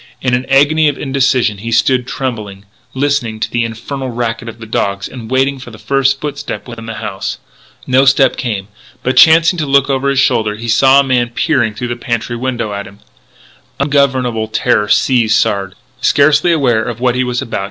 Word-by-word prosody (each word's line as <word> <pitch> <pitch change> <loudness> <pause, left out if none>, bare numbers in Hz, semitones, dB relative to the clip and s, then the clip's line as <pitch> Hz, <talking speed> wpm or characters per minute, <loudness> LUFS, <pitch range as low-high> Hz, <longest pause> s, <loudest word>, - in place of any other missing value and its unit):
In 125 -1 -1
an 125 +1 0
agony 150 +3 +3
of 145 - -4
indecision 130 -6 0
he 115 +3 -5
stood 125 +2 +2
trembling, 105 -8 -5 0.3
listening 130 -5 -1
to - - -3
the 120 0 0
infernal 125 +4 -5
racket 115 -1 -3
of 115 - -10
the 115 - -10
dogs, 100 -2 -2
and 115 -4 -10
waiting 135 +1 +1
for 125 - -10
the 110 - -12
first 135 +4 0
footstep 145 -1 -6
within 115 -2 -9
the 115 - -5
house. 100 -4 -5 0.5
No 130 +1 +3
step 135 0 +4
came. 105 -5 -4 0.4
But, 130 - 0
chancing 165 +2 +5
to 150 - -2
look 140 0 +3
over 135 +1 0
his 140 - -1
shoulder, 115 -6 +1
he 115 +2 -7
saw 135 +4 +5
a - - 0
man 125 -3 0
peering 120 -4 0
through 120 +2 -4
the 120 - -2
pantry 120 0 -3
window 120 -3 -3
at 100 0 -5
him. 100 - -15 0.8
Ungovernable 130 -5 +1
terror 105 -1 +1
seized 115 -4 +3
Sard. 95 -1 -1
125 Hz, 170 wpm, -14 LUFS, 115-135 Hz, 0.8 s, chancing